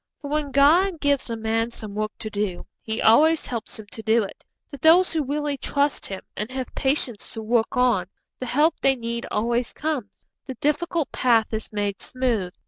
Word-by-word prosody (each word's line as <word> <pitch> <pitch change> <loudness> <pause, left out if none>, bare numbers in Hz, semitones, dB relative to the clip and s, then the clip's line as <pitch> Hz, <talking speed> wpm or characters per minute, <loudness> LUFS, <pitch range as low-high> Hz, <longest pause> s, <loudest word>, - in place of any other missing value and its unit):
For 285 - -7
when 300 -1 0
God 320 +6 +4
gives 285 -3 +1
a 230 - -2
man 225 +1 0
some 215 -3 -7
work 215 0 -2
to 215 - -6
do, 205 -4 -2 0.2
He 220 0 -3
always 310 +8 +5
helps 230 -3 -5
him 220 - -9
to 200 - -7
do 220 +1 +3
it. 195 - -9 0.3
To 280 - -8
those 330 +6 +5
who 315 -2 +1
really 290 +1 -2
trust 285 +2 0
Him, 195 -1 -6
and 210 +2 -4
have 260 -1 -5
patience 265 -5 -2
to 225 - -5
work 230 +2 +1
on, 240 -8 +3 0.3
the 255 - -4
help 300 +7 +3
they 270 0 +4
need 235 -1 -4
always 235 +2 0
comes, 290 -10 -4 0.2
the 260 - -5
difficult 300 +4 0
path 230 -3 +2
is 220 0 -4
made 205 -2 -2
smooth. 240 -8 -1
245 Hz, 195 wpm, -24 LUFS, 220-285 Hz, 0.3 s, always